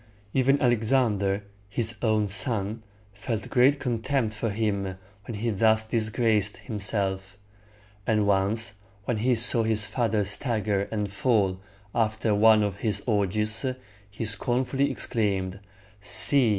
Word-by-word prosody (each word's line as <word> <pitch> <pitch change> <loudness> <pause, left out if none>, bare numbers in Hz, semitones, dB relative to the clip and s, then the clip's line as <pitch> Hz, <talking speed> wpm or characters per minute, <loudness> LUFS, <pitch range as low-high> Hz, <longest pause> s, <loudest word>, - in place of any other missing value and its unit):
Even 135 +2 +2
Alexander, 110 -5 +1 0.3
his 115 +3 0
own 110 -3 +1
son, 110 0 -1 0.3
felt 105 +1 -5
great 135 +3 +3
contempt 120 -1 -1
for 110 +1 -3
him 100 -3 -2 0.3
when 115 - -5
he 115 +3 -2
thus 110 +1 +3
disgraced 110 -2 0
himself; 100 -3 -3 0.7
and 105 -2 +2
once 100 +2 0 0.3
when 120 -1 -1
he 125 +3 +1
saw 115 +1 +6
his 110 -1 +3
father 110 -1 -1
stagger 105 -1 -2
and 105 -3 -3
fall 100 -4 0 0.3
after 110 -1 0
one 110 +1 +5
of 100 -2 -3
his 100 -2 -2
orgies, 105 0 0 0.5
he 105 +3 -6
scornfully 125 +6 0
exclaimed, 100 -5 -1 0.4
"See! 105 +6 +5
110 Hz, 125 wpm, -26 LUFS, 100-115 Hz, 0.7 s, saw